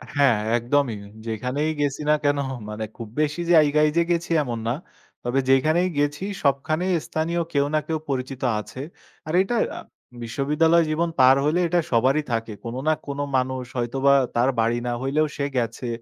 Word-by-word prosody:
হ্যাঁ, 140 -6 +4 0.2
একদমই। 120 -1 0 0.3
যেখানেই 125 +8 -1
গেছি 145 0 -1
না - - +6
কেনো 145 0 +2 0.3
মানে 110 +1 -4
খুব 115 - -7
বেশি 155 +3 -1
জায়গায় 150 -1 +5
যে 170 - +5
গেছি 170 0 -1
এমন 120 -4 -4
না। 120 - +1 0.5
তবে 125 +2 0
যেইখানেই 155 +7 +3
গেছি 145 +3 0 0.2
সবখানেই 155 +6 +1
স্থানীয় 165 +2 -1
কেউ 140 -1 +3
না - - +4
কেউ 160 - 0
পরিচিত 130 -1 -3 0.2
আছে। 110 +5 -8 0.5
আর 155 - -3
এটা 195 +5 -1 0.2
আ - - -5 0.4
বিশ্ববিদ্যালয় 150 +7 +2
জীবন 165 +2 0
পার 130 +1 +7
হইলে 155 +4 +2
এটা 175 +1 +2
সবারই 130 +6 +3
থাকে। 115 -1 -2
কোনো 120 +2 -4
না 155 - +5
কোনো 140 0 -3
মানুষ 130 0 -2
হয়তোবা 135 +3 +2 0.2
তার 120 +2 +3
বাড়ি 115 +1 +2
না 120 - 0
হইলেও 150 +4 +1
সে 140 - -1
গেছে। 115 +1 -2
140 Hz, 170 wpm, -23 LUFS, 125-155 Hz, 0.5 s, পার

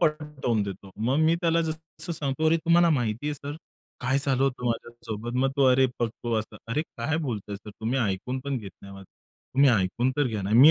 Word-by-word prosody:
पटवून 150 - 0
देतो. 100 0 -7
मग 120 +6 +1
मी 160 - +5
त्याला 165 -1 +3
जसं 160 +2 -5
सांगतो, 155 0 0
"तुम्हाला 170 +1 +4
माहिती 120 -2 0
आहे 150 - 0
सर, 145 +1 -6 0.4
काय 130 +2 +2
झालं 135 -2 +1
होतं 135 -2 0
माझ्यासोबत?" 120 -1 -4
मग 135 +1 +2
तो, 140 - +4
"अरे 130 +1 +5
बघतो" 120 0 -2
असं. 110 - -6
"अरे, 145 +6 0
काय 155 0 -3
बोलताय 110 -10 -3
सर 105 +1 -11
तुम्ही 115 +5 -2
ऐकून 110 +3 -1
पण 140 -1 -1
घेत 100 -4 -8
नाही 100 0 -10
माझं. 95 - -11 0.5
तुम्ही 140 +1 +6
ऐकून 115 +4 +2
तर 145 -2 +3
घ्या 110 -4 -2
ना, 95 - -3
मी 135 +7 +9
130 Hz, 200 wpm, -27 LUFS, 110-150 Hz, 0.5 s, मी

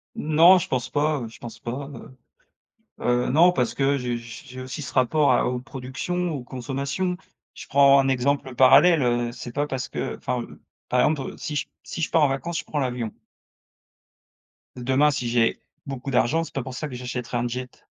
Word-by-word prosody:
Non, 165 +5 +6
je 175 - -4
pense 125 -3 -2
pas, 150 0 +1
heu, 115 - -5
je 110 - -15
pense 120 - -9
pas, 135 +4 -5
heu 140 -2 -11 0.8
heu, 120 0 +1
non, 165 +7 +6
parce 125 -9 0
que 140 +2 +2
j 125 -2 -2
j 115 -1 -10
j'ai 130 -1 -9
aussi 130 +4 -6
ce - - -7
rapport 140 +3 +3
à 125 - +2
aux 125 0 -1
productions, 140 +7 -4
aux 135 -5 -5
consommations. 140 +8 -3 0.4
Je - - -10
prends 140 0 +6
un 135 0 +2
exemple 135 0 0
parallèle, 145 +6 +6
heu, 120 -1 0
c'est 120 0 -8
pas 145 +3 -1
parce 130 -2 -4
qu'enfin 120 -2 -3 0.5
par 125 - +3
exemple, 145 -2 0
si 150 - -4
j - - -2
si 165 - -6
je - - -1
pars 165 - +3
en - - +4
vacances, 165 +5 -3
je - - -5
prends 150 - -4
l'avion. 125 -4 -2 1.7
Demain 130 +4 +3
si 125 -4 -2
j'ai 115 -1 +2 0.3
beaucoup 135 -1 -5
d'argent, 140 +6 +2
c'est - - -12
pas 135 - -2
pour 130 +1 -7
ça 150 +4 -4
que 130 - -8
j'achèterai 125 -1 -5
un 120 - -1
jet. 125 +1 -7
130 Hz, 195 wpm, -24 LUFS, 125-145 Hz, 1.7 s, Non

